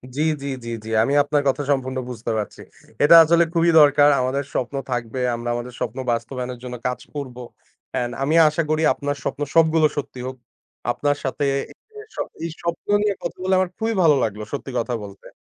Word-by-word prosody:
জি, 150 - -1 0.2
জি, 140 - -5 0.2
জি, - - -5
জি 110 - -8
আমি 140 - 0
আপনার 145 0 +1
কথা 140 +2 +1
সম্পূর্ণ 130 -1 -1
বুঝতে 115 -1 -4
পারছি। 105 - -5 0.4
এটা 160 +3 +8
আসলে 170 +2 +4
খুবই 170 0 +3
দরকার 145 0 +6
আমাদের 135 +3 -1
স্বপ্ন 130 +2 -2 0.2
থাকবে 120 +1 -3 0.2
আমরা 120 +1 -5
আমাদের 120 +1 -5
স্বপ্ন 120 +1 -3
বাস্তবায়নের 125 +1 -4
জন্য 125 -1 -6
কাজ 125 - -3 0.2
করব, 130 -4 -5 0.6
অ্যান্ড 120 0 -1
আমি 155 +4 +1
আশা 160 +2 -1
করি 155 0 +1
আপনার 145 +1 -3
স্বপ্ন - - -4
সবগুলো 160 -1 +5
সত্যি 135 -3 -5
হোক। 130 - -6 0.6
আপনার 145 +3 0
সাথে 140 +1 -1 1.0
এই 165 - -2
স্বপ্ন 170 0 -4
নিয়ে 210 -1 +1
কথা 170 - -4
বলে 190 - +1
আমার 185 - +1
খুবই 225 0 -1
ভালো 155 -3 +6
লাগলো 105 -1 -3
সত্যি 140 -1 -4
কথা 120 +1 -2
বলতে। 100 -1 -11
140 Hz, 185 wpm, -22 LUFS, 125-155 Hz, 1.0 s, এটা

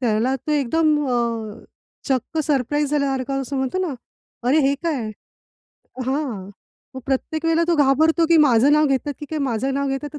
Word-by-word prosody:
त्याला 235 +2 +1
तो 300 +3 -4
एकदम 300 +2 +2
अ, 230 -3 -2 0.4
चक्क 265 +4 -1
सरप्राईज 290 +1 0
झाल्यासारखं 275 -2 -1
असं 275 +1 -5
म्हणतो 265 +7 -1
ना, 355 -7 -2 0.5
अरे 290 - +4
हे 275 0 +2
काय? 275 -10 -2 1.0
हां, 260 -8 -3 0.5
मग - - -5
प्रत्येक 315 +4 -2
वेळेला 330 +1 +3
तो 340 - +3
घाबरतो, 315 +4 +3
की 335 - +6
माझं 275 -3 +5
नाव 305 0 +4
घेतात 275 +2 -1
की 295 - -6
काय, 315 - -3
माझं 265 0 -1
नाव 280 0 -1
घेतात 270 +2 -3
की 295 - -6
275 Hz, 170 wpm, -21 LUFS, 255-305 Hz, 1.0 s, की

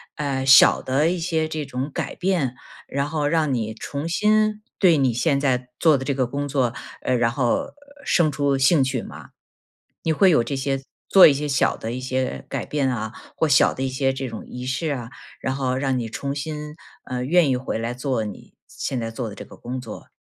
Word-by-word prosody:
呃， 135 -3 -2
小 135 0 +7
的 140 +5 +1
一 180 0 -1
些 160 -2 0
这 155 -1 -4
种 135 +1 -4
改 - - -4
变， 175 -9 0 0.3
然 140 +1 -1
后 150 -1 -1
让 155 -2 +1
你 110 -3 -2
重 140 +7 -5
新 215 +3 +2 0.2
对 175 -5 +5
你 130 -4 +2
现 140 +4 +1
在 125 -3 0
做 155 -4 +5
的 135 - -5
这 140 - 0
个 130 -1 +1
工 140 +3 -3
作， 130 -4 0 0.3
呃， 130 - 0
然 120 -1 +2
后 275 - 0 0.3
生 155 -4 +3
出 140 -1 +1
兴 140 +3 +4
趣 130 -2 -1
吗？ - - -11 0.8
你 165 - +2
会 190 +4 +5
有 120 -7 +4
这 140 - -4
些， 135 0 -1 0.3
做 195 - +9
一 - - +6
些 145 +2 -3
小 135 -2 +1
的 110 - -5
一 130 - -4
些 130 0 -2
改 - - -3
变 140 -3 0
啊， 110 -2 -4 0.2
或 160 - +2
小 140 - +4
的 130 - -4
一 135 - 0
些 135 +1 0
这 135 0 -4
种 115 -3 -7
仪 125 0 -7
式 135 +5 -2
啊， 120 -3 -6 0.3
然 130 - -2
后 130 -2 -1
让 135 -1 0
你 115 - -4
重 140 +5 -4
新， 150 +1 -5 0.3
呃， 125 -1 -3
愿 160 +2 +3
意 130 - +2
回 125 -2 -3
来 115 +2 -3
做 125 -2 -1
你 105 - -9
现 130 - -4
在 115 - -3
做 115 0 -4
的 100 - -9
这 - - -9
个 - - -14
工 125 +2 -6
作？ 115 -4 -9
135 Hz, 235 characters per minute, -23 LUFS, 125-150 Hz, 0.8 s, 做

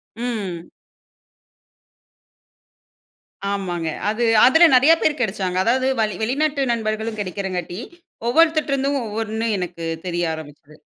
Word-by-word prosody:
ம். 210 -8 -4 2.8
ஆமாங்க. 175 -5 -3 0.2
அது 220 +3 -1 0.2
அதுல 320 +7 +7
நிறைய 275 +6 +6
பேர் 305 -1 +1
கிடைத்தார்கள். 190 -5 -1
அதாவது 255 +5 +1
வளி 215 -1 -1
வெளிநாட்டு 280 +5 0
நண்பர்களும் 220 -1 -2
கிடைக்கிறதால், 185 -3 -3 0.6
ஒவ்வொருவர்கிட்டேயிருந்தும் 285 -2 +2
ஒவ்வொன்று 220 +1 -3
எனக்கு 175 -2 -5 0.2
தெரிய 175 0 -1
ஆரம்பித்தது. 150 -1 -11
215 Hz, 95 wpm, -21 LUFS, 185-260 Hz, 2.8 s, அதுல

